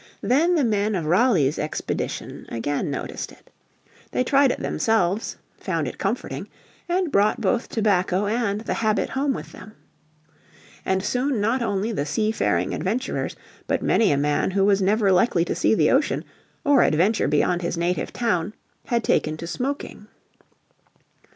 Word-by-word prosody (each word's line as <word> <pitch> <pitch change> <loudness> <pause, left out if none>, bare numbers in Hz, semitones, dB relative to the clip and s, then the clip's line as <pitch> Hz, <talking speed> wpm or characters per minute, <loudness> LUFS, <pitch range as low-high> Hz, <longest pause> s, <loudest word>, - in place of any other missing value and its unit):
Then 325 +8 +3
the 305 - +2
men 210 -2 +1
of 170 -4 -2
Raleigh's 170 - +3
expedition 150 - -4
again 140 +6 -2
noticed 140 - -5
it. - - -20 0.6
They 255 - 0
tried 275 +1 +4
it - - -4
themselves, 215 -2 0 0.2
found - - -2
it - - -7
comforting, - - -3 0.4
and 355 -2 0
brought 205 -1 +3
both 240 - 0
tobacco 195 -3 +1
and 210 -1 -1
the 225 - -2
habit 215 -1 0
home 275 +1 0
with - - -6
them. 215 +3 -12 1.1
And 190 0 0
soon 250 +3 0
not 225 +5 +1
only 210 -1 -1
the 150 -9 -2
seafaring 145 - 0
adventurers 220 - -2 0.3
but - - 0
many 220 -6 +3
a 140 - +2
man 145 +4 +1
who 195 +1 +2
was 200 -1 +3
never 200 +1 +3
likely 180 -2 +3
to - - -2
see - - +2
the - - +3
ocean, 280 +3 +1 0.4
or 285 -3 +5
adventure 185 +8 +2
beyond 175 +4 +1
his 170 0 -2
native 175 +1 -1
town, 210 -4 -1 0.3
had 235 -1 0
taken 155 0 +1
to 165 - -6
smoking. 250 +2 -4
210 Hz, 155 wpm, -23 LUFS, 175-235 Hz, 1.1 s, or